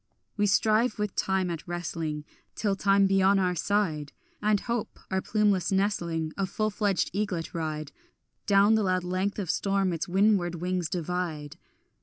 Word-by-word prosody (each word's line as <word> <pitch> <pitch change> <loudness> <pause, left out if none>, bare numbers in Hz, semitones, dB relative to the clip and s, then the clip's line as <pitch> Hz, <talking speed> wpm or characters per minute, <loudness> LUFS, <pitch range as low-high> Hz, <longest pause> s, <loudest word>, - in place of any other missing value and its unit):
We 205 -1 +2
strive 220 +5 +2
with 210 -2 -2
time 190 -2 0
at 165 0 -6
wrestling 165 -3 -4 0.3
Till 205 -3 0
time 195 0 +3
be 195 0 +3
on 195 +1 +5
our 185 -2 +1
side 170 -6 -1 0.3
And 210 -1 +2
hope, 235 -2 -3
our 190 0 +1
plumeless 205 -4 +1
nestling, 170 -5 0
A 195 -1 0
full 215 +3 -1
fledged 200 -3 0
eaglet 190 -5 -2
ride 155 -3 -4 0.6
Down 200 +1 +5
the 220 - +3
loud 185 -2 +1
length 185 +3 -1
of 190 -6 -1
storm 195 -2 0
its 165 - -3
windward 190 -2 +2
wings 180 -1 -2
divide. 175 -4 -3
190 Hz, 160 wpm, -28 LUFS, 175-205 Hz, 0.6 s, on